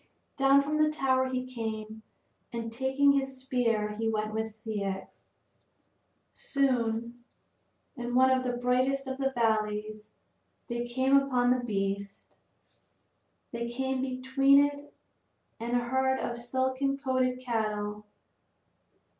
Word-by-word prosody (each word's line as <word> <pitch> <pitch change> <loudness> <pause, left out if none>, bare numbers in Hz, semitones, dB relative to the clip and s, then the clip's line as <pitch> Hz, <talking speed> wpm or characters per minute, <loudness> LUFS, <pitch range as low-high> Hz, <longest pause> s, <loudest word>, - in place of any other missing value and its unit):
Down 275 0 +5
from 300 +2 -1
the 305 - +4
tower 260 -3 +1
he 255 0 -2
came, 220 -3 -5 0.5
and 230 -1 -4
taking 265 +3 +2
up 280 0 +5
his 270 -1 -5
spear 240 -5 0
he 225 +1 -2
went 215 -1 -2
with 220 0 -1
Ceyx. 205 -3 -5 1.1
Soon, 240 -3 -1 0.7
in 245 -1 -4
one 260 +1 +5
of 260 0 +3
the 250 -1 -2
brightest 255 +3 +1
of 265 0 -5
the 270 0 +1
valleys, 215 -2 -1 0.5
they 240 0 -2
came 260 +3 +2
upon 255 -3 +3
the 250 0 +1
beast; 200 -2 -3 1.2
they 235 0 -3
came 265 +1 -2
between 265 +2 +4
it 285 0 -6 0.7
and 235 +2 -2
a 240 - 0
herd 265 +1 +1
of 235 - -3
silken 260 +3 -1
coated 255 -2 0
cattle. 210 -3 -2
250 Hz, 125 wpm, -29 LUFS, 220-265 Hz, 1.2 s, Down